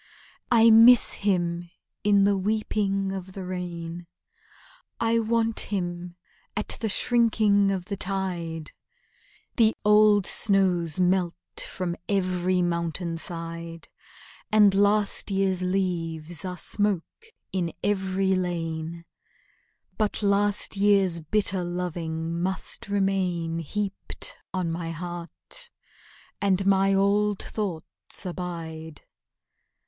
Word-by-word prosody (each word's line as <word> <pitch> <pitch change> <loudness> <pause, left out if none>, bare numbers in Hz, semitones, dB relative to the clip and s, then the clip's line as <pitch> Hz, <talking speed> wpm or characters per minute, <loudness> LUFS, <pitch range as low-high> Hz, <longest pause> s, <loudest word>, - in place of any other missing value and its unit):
I 230 -1 +7
miss 230 +2 +7
him 175 -3 -1 0.3
in 200 -1 +4
the 200 0 +3
weeping 195 -1 -1
of 190 -1 -6
the 190 -1 -6
rain; 175 -2 -5 0.9
I 230 0 +2
want 225 0 0
him 175 -3 -3 0.4
at 210 - -2
the 220 - 0
shrinking 215 -3 +3
of 190 -2 -2
the 200 +1 -4
tide; 175 -5 -3 0.9
The 225 -2 +4
old 210 -1 +5
snows 185 -7 +2
melt 180 -1 +2 0.3
from 180 -2 -3
every 185 -2 +1
mountain 170 0 -2
side, 165 0 -5 0.6
And 210 -2 +6
last 205 +1 +2
year's 195 -2 0
leaves 175 -3 -2
are 180 -1 -4
smoke 205 - -1 0.2
in 175 -3 -1
every 190 -1 +1
lane; 170 -2 -3 0.9
But 215 0 0
last 205 +1 +1
year's 195 -4 +3
bitter 190 +2 0
loving 170 -2 -3
must 190 +2 -2
remain 185 -4 0
Heaped 205 - -5 0.2
on 185 -3 -2
my 165 0 -4
heart, 175 - -7 0.7
and 195 -1 +2
my 195 0 +4
old 200 +1 +2
thoughts 190 -2 -4
abide! 165 -3 -6
185 Hz, 100 wpm, -26 LUFS, 170-205 Hz, 0.9 s, I